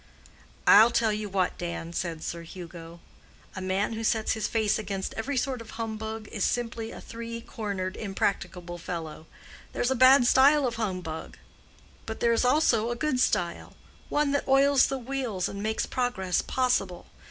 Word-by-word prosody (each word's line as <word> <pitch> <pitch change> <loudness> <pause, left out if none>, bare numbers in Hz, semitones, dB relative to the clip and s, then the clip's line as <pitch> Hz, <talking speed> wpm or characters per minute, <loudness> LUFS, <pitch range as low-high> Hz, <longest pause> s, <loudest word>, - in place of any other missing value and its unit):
"I'll 220 +3 +8
tell 225 -2 +2
you 210 0 -4
what, 185 -2 -1
Dan," 170 -1 -5
said 165 -2 -3
Sir 170 - -4
Hugo, 170 -1 -10 0.5
"a 190 - -5
man 190 +4 0
who 225 0 -4
sets 220 -1 +1
his 220 - -1
face 215 -1 +1
against 195 -3 -4
every 265 +5 -3
sort 255 -1 -1
of 225 0 -11
humbug 220 -1 -5
is 205 - -2
simply 230 -2 -1
a - - -9
three 230 0 -7
cornered, 200 -5 -4
impracticable 180 -3 -3
fellow. 160 -2 -6 0.5
There's 245 - 0
a - - +2
bad 255 +1 +7
style 280 +3 +5
of 235 -2 -2
humbug, 185 -7 -4 0.7
but 220 - -5
there 235 0 +3
is 230 - +2
also 250 -4 +3
a 240 - -1
good 260 0 0
style—one 265 +9 -1
that 285 - -1
oils 275 0 +5
the 270 - -2
wheels 250 -7 -2
and 200 - -6
makes 220 +1 -1
progress 245 -8 -1
possible. 245 -9 0
220 Hz, 165 wpm, -27 LUFS, 185-245 Hz, 0.7 s, I'll